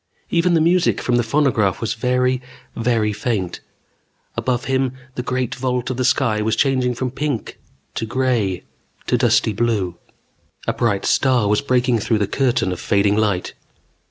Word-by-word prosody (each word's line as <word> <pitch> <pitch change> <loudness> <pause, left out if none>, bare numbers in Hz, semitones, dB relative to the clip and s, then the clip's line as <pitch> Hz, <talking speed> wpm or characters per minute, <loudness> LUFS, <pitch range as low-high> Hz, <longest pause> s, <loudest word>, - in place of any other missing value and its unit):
Even 170 +1 +3
the 160 - +3
music 175 +2 +3
from 120 -1 +1
the - - +3
phonograph 115 -6 +1
was 115 - -1
very, 125 +2 +1 0.3
very 115 -2 +1
faint. 105 -7 -2 0.8
Above 125 0 -1
him, 130 -1 0 0.2
the 125 - -3
great 130 -1 -2
vault 125 0 -2
of 125 - -4
the 130 - 0
sky 110 -4 +2
was 110 +1 +1
changing 130 -1 +1
from 125 +1 -3
pink 140 -3 -3 0.3
to 115 - -3
gray 120 -7 0 0.4
to - - +1
dusty 110 - +2
blue. 100 -6 -1 0.7
A - - 0
bright 105 -5 0
star 125 -6 +3
was 105 +1 +2
breaking 125 -3 +1
through 110 +2 +1
the 105 - +1
curtain 120 -3 0
of 90 - -4
fading 100 0 +2
light. 105 -4 0
120 Hz, 160 wpm, -20 LUFS, 105-130 Hz, 0.8 s, Even